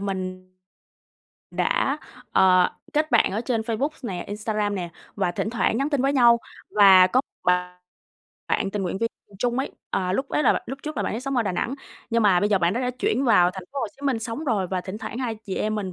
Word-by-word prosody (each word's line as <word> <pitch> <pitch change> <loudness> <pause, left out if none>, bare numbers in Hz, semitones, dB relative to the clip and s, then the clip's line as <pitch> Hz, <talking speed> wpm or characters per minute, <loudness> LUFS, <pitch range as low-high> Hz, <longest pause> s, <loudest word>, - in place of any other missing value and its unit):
mình 185 -2 -4 1.0
đã, - - 0 0.3
ờ, 185 -1 +5 0.2
kết 305 0 +1
bạn 235 -5 +4
ở 215 - -1
trên 235 -2 -1
Facebook 230 +5 -1
nè, 185 -7 -4
Instagram 210 0 -2
nè 175 -3 -4 0.2
và 175 - 0
thỉnh 215 - -2
thoảng 225 -1 +1
nhắn 280 +3 0
tin 280 -3 +1
với 275 +1 +2
nhau. 235 -3 +6 0.3
Và 195 -3 +7
có 250 +8 +2 0.2
bạn 180 0 +1 0.7
bạn 195 - 0
tình 205 -1 -2
nguyện 185 +1 -2
viên 230 0 0 0.2
cùng 200 - -17
chung 245 +3 0
ấy, 270 - -2 0.2
à, 185 -1 0
lúc 265 +7 -1
ấy 300 - 0
là - - +5
bạn - - -2
lúc 270 +2 -6
trước 305 -2 -5
là 205 - 0
bạn - - -2
ấy 230 - -3
sống 275 0 -3
ở 235 - +3
Đà 195 - -2
Nẵng, 235 +9 -2 0.4
nhưng 230 0 +2
mà 185 -4 +4
bây 205 - +2
giờ 200 -2 +3
bạn 170 +1 +2
đó 240 - -1
đã 250 0 0
chuyển 260 +5 +1
vào 180 -7 +5
thành 185 0 -8
phố 280 - -4
Hồ - - -1
Chí - - -21
Minh 255 -4 +1
sống 230 +7 -5
rồi, 210 -8 0
và 185 0 -2
thỉnh 190 +3 -7
thoảng 235 - -6
hai 240 -4 -2
chị 190 -3 -4
em 215 0 -1
mình 195 -4 -3
215 Hz, 245 wpm, -24 LUFS, 185-245 Hz, 1.0 s, Và